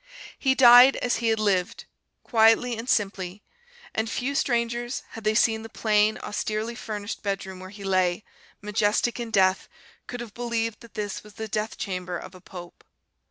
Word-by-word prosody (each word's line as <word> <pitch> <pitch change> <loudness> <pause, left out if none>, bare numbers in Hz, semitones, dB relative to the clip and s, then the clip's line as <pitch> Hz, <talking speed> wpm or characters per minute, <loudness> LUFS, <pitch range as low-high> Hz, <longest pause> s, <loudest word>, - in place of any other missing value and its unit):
He 265 -1 +2
died 245 +1 +8
as 245 - 0
he 230 - -1
had 220 -1 +2
lived, 190 -4 0 0.4
quietly 225 +1 +4
and 230 +3 -6
simply; 195 -2 -1 0.5
and 220 0 -1
few 255 +4 -2
strangers, 240 -1 -1
had 225 - -10
they 215 0 +1
seen 220 0 +3
the 225 - -9
plain, 215 -1 +2
austerely 215 +2 -3
furnished 210 -3 -6
bedroom 195 -2 -4
where 185 0 -9
he 200 0 -11
lay, 185 0 +1 0.4
majestic 210 +3 0
in 235 -1 -4
death, 190 -3 +2 0.4
could 245 - -6
have 235 -4 -8
believed 230 -2 -2
that 235 -2 -16
this 205 -2 -4
was 210 0 -16
the 220 - -5
death 215 +1 -3
chamber 180 -2 -4
of 185 - -10
a 185 - -14
pope. 175 -2 -11
215 Hz, 170 wpm, -25 LUFS, 195-235 Hz, 0.5 s, died